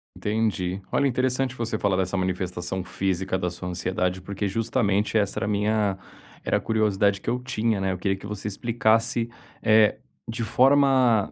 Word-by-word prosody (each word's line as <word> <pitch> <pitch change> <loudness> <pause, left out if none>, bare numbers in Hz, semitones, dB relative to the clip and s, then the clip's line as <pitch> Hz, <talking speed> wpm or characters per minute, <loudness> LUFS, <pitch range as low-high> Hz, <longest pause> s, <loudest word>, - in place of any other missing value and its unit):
Entendi. 100 -3 -1
Olha 140 - +2
interessante 130 0 0
você 115 -2 -2
falar 100 -2 +1
dessa 95 +1 -1
manifestação 90 0 -2
física 95 0 -1
da 90 - -1
sua 90 +1 -6
ansiedade 90 +1 -2
porque 100 +2 -3
justamente 105 0 0
essa 100 -2 0
era 95 - -2
minha 105 -1 +1 0.5
era - - +1
a - - -1
curiosidade 105 -3 +1
que - - -3
eu 125 - 0
tinha, 110 -4 0
né, 95 0 0
eu 90 - -3
queria 95 +1 0
que 100 - -12
você 105 0 -5
explicasse, 115 +2 +1 0.3
eh, 110 -1 +4 0.3
de 115 +1 -3
forma 130 -4 +4
105 Hz, 165 wpm, -25 LUFS, 95-115 Hz, 0.5 s, eh